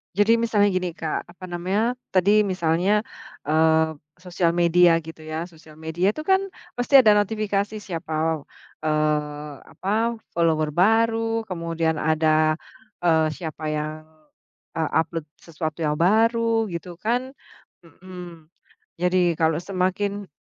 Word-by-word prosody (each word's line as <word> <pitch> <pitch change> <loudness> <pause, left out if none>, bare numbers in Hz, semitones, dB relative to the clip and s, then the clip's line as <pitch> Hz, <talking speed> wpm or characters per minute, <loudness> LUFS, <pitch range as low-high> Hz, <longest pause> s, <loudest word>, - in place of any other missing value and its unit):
Jadi 210 +3 +4
misalnya 225 -3 +2
gini, 185 -3 -1
Kak, 160 -1 -3
apa 180 +1 -14
namanya 195 +8 -1 0.2
tadi, 205 +3 +4
misalnya, 185 +2 +1 0.5
eee, 160 0 +3 0.2
sosial 175 -2 0
media 170 0 +4
gitu, 160 0 -11
ya. 160 +3 -4
Sosial 160 -2 -17
media 175 +5 0
itu 310 - -7
kan 380 +5 +3 0.4
pasti 265 +3 +6
ada 215 -4 +5
notifikasi 210 0 -1
siapa, 160 -4 -2 0.4
eee, 150 -1 -1 0.2
apa, 225 +3 -1 0.2
follower 160 -2 +2
baru, 225 +5 +2
kemudian 165 -2 -1
ada, 155 0 +2 0.4
eee, 160 -2 +3
siapa 160 -1 -7
yang, 155 +1 -4 0.7
eee, 160 -2 -1
upload 165 -1 -4 0.2
sesuatu 160 -1 -5
yang 150 -2 0
baru 225 +5 +2
gitu 175 0 -6
kan, 245 +4 -1 0.5
hmm. 175 -2 -12 0.5
Jadi 180 -1 +2
kalau 160 -1 +3
semakin 195 +2 -2
175 Hz, 120 wpm, -23 LUFS, 160-205 Hz, 0.7 s, pasti